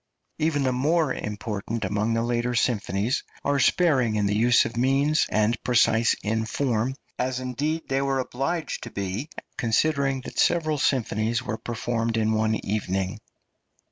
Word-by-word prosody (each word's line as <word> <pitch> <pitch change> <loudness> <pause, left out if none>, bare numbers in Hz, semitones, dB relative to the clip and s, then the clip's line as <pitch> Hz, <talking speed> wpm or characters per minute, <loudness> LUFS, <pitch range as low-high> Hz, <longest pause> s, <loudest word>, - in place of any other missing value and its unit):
Even 155 -2 +1
the 130 - +2
more 150 +3 +1
important 105 +1 -4
among 105 +4 0
the 115 - +1
later 120 +1 -1
symphonies 110 -1 0 0.2
are 140 0 +2
sparing 135 -10 +3
in 105 -1 +1
the 100 +1 +1
use 120 +3 +4
of 115 - -5
means, 135 +5 +2
and 110 +2 +1
precise 115 -2 +3
in 110 +1 0
form, 120 +1 -1 0.2
as 125 0 -1
indeed 145 +6 -2
they 135 0 0
were 135 -1 0
obliged 135 +6 -2
to - - -7
be, 100 - -4 0.3
considering 135 +3 +1
that - - -7
several 155 -4 +2
symphonies 115 -3 0
were 110 - -3
performed 115 0 -2
in 110 0 +2
one 110 0 +1
evening. 95 -1 -2
120 Hz, 150 wpm, -25 LUFS, 110-135 Hz, 0.3 s, use